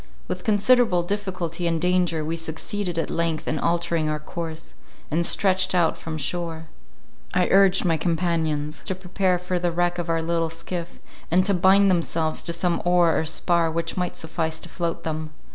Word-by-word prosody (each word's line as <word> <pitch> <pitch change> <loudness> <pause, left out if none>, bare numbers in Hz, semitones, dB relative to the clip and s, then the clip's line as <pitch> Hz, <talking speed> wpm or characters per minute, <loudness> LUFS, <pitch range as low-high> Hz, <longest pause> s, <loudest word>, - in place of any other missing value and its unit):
With - - -4
considerable 215 -3 +3
difficulty 180 -3 -3
and 165 -1 0
danger 175 -3 +1
we 165 +2 -2
succeeded 170 +3 -4
at 165 - -1
length 165 -2 -1
in 155 - -1
altering 170 -1 0
our 155 - -1
course, 160 +1 -7 0.4
and 165 +3 +1
stretched 190 +1 +3
out 170 -2 +3
from 160 -1 -6
shore. 165 0 -3 0.7
I 180 0 +3
urged 195 -1 +5
my 165 -2 +2
companions 160 -3 -1
to 190 - -2
prepare 185 0 0
for 180 0 -2
the 175 0 0
wreck 175 +1 0
of 170 -1 -3
our 165 0 +1
little 165 0 0
skiff, 170 +1 -6 0.3
and 185 +3 +3
to 200 - +3
bind 190 +2 +5
themselves 165 -2 0
to - - -4
some 170 +1 0
oar 175 -2 +4
or - - 0
spar 170 +1 +1
which 165 +1 -2
might 180 -1 -2
suffice 160 0 -3
to 175 - -7
float 170 -1 -3
them. 155 -1 -4
170 Hz, 180 wpm, -24 LUFS, 160-180 Hz, 0.7 s, urged